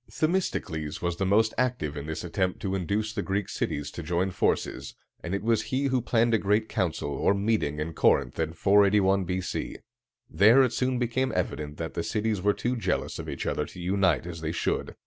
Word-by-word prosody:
Themistocles 105 Hz, -, -1 dB
was 85 Hz, -1 st, -2 dB
the 95 Hz, -, 0 dB
most 110 Hz, +3 st, +3 dB
active 120 Hz, -, -1 dB
in 70 Hz, 0 st, -6 dB
this 80 Hz, 0 st, -4 dB
attempt 90 Hz, +1 st, -1 dB
to 95 Hz, -2 st, -2 dB
induce 100 Hz, +4 st, -1 dB
the 105 Hz, -, -2 dB
Greek 100 Hz, 0 st, -2 dB
cities 75 Hz, -2 st, -3 dB
to -, -, -7 dB
join 90 Hz, +4 st, -1 dB
forces, -, -, -1 dB, 0.3 s
and 90 Hz, -, -2 dB
it 100 Hz, -, -3 dB
was 115 Hz, -1 st, +2 dB
he 130 Hz, +2 st, -1 dB
who 130 Hz, -2 st, +1 dB
planned 115 Hz, 0 st, +2 dB
a 110 Hz, -, +4 dB
great 105 Hz, +3 st, +1 dB
council, 80 Hz, -7 st, -2 dB
or 100 Hz, -, +2 dB
meeting, 100 Hz, -8 st, 0 dB
at 80 Hz, +2 st, -3 dB
Corinth, -, -, +2 dB
in 80 Hz, 0 st, -1 dB
481 100 Hz, 0 st, +4 dB
B.C. 90 Hz, +1 st, -3 dB, 0.5 s
There 110 Hz, -, +6 dB
it 125 Hz, -, 0 dB
soon 130 Hz, 0 st, 0 dB
became 125 Hz, +2 st, 0 dB
evident 75 Hz, -1 st, -3 dB
that 80 Hz, -1 st, -5 dB
the -, -, -2 dB
cities 105 Hz, +2 st, -1 dB
were 100 Hz, +2 st, +2 dB
too 125 Hz, +1 st, -1 dB
jealous 115 Hz, -, -2 dB
of -, -, -6 dB
each -, -, -4 dB
other -, -, -1 dB
to -, -, -12 dB
unite 90 Hz, -2 st, +1 dB
as 85 Hz, -2 st, -7 dB
they 80 Hz, 0 st, -2 dB
should. 85 Hz, -, -2 dB
100 Hz, 205 wpm, -27 LUFS, 85-110 Hz, 0.5 s, There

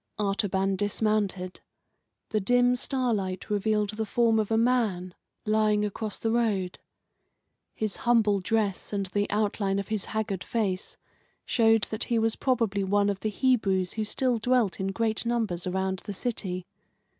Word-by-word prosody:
Artaban 195 Hz, -2 st, 0 dB
dismounted. 205 Hz, -3 st, 0 dB, 0.7 s
The 215 Hz, -, +1 dB
dim 245 Hz, +4 st, +3 dB
starlight 225 Hz, -9 st, -1 dB
revealed 210 Hz, 0 st, +1 dB
the 220 Hz, +1 st, -3 dB
form 225 Hz, 0 st, +3 dB
of 215 Hz, -, -1 dB
a 225 Hz, -, +2 dB
man 220 Hz, -7 st, +1 dB, 0.3 s
lying 215 Hz, -1 st, +2 dB
across 210 Hz, +1 st, -4 dB
the 225 Hz, -, -1 dB
road. 210 Hz, -6 st, 0 dB, 1.0 s
His 215 Hz, -2 st, -2 dB
humble 225 Hz, -5 st, +3 dB
dress 205 Hz, 0 st, -1 dB
and 200 Hz, -1 st, -1 dB
the 205 Hz, +2 st, -1 dB
outline 205 Hz, -1 st, 0 dB
of 200 Hz, +1 st, -3 dB
his 215 Hz, -3 st, -1 dB
haggard 205 Hz, -4 st, -3 dB
face 200 Hz, -5 st, -2 dB, 0.5 s
showed 225 Hz, -2 st, +3 dB
that 220 Hz, -, -1 dB
he 235 Hz, -, 0 dB
was 225 Hz, 0 st, +1 dB
probably 225 Hz, -6 st, 0 dB
one 205 Hz, +1 st, +2 dB
of 195 Hz, -, -5 dB
the 215 Hz, -, -1 dB
Hebrews 200 Hz, -6 st, +1 dB
who 220 Hz, -, -2 dB
still 245 Hz, +2 st, 0 dB
dwelt 245 Hz, -3 st, +1 dB
in 190 Hz, -, -1 dB
great 220 Hz, +2 st, -1 dB
numbers 225 Hz, -7 st, -1 dB
around 190 Hz, 0 st, -1 dB
the 205 Hz, -, -4 dB
city. 185 Hz, -5 st, -3 dB
210 Hz, 150 wpm, -27 LUFS, 195-225 Hz, 1.0 s, dim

